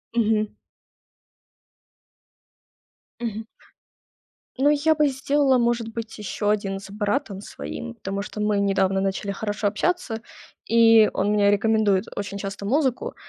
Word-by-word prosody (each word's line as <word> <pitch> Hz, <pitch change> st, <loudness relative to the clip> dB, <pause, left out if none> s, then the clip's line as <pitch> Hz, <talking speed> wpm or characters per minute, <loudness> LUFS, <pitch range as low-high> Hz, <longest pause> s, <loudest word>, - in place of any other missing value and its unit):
Мгм. 215 Hz, -2 st, +1 dB, 2.7 s
Мгм. 220 Hz, -1 st, -4 dB, 1.1 s
Ну, 285 Hz, +2 st, +4 dB
я 300 Hz, +2 st, +3 dB
бы 300 Hz, -1 st, +3 dB
сделала, 275 Hz, 0 st, +2 dB
может 235 Hz, -1 st, +1 dB
быть, 230 Hz, -1 st, -6 dB
ещё 210 Hz, 0 st, -3 dB
1 195 Hz, -2 st, 0 dB
с 195 Hz, 0 st, -11 dB
братом 205 Hz, -1 st, -2 dB
своим, 75 Hz, -, -7 dB
потому 195 Hz, +1 st, -4 dB
что 210 Hz, +1 st, -7 dB
мы 210 Hz, -1 st, +1 dB
недавно 195 Hz, -1 st, +1 dB
начали 195 Hz, +1 st, -2 dB
хорошо 205 Hz, 0 st, -3 dB
общаться, 225 Hz, -, -1 dB, 0.4 s
и 225 Hz, -1 st, +6 dB
он -, -, 0 dB
мне 205 Hz, -1 st, +4 dB
рекомендует 205 Hz, -2 st, +2 dB
очень 200 Hz, 0 st, -4 dB
часто 195 Hz, 0 st, -6 dB
музыку. 260 Hz, +3 st, 0 dB
210 Hz, 120 wpm, -24 LUFS, 200-235 Hz, 2.7 s, и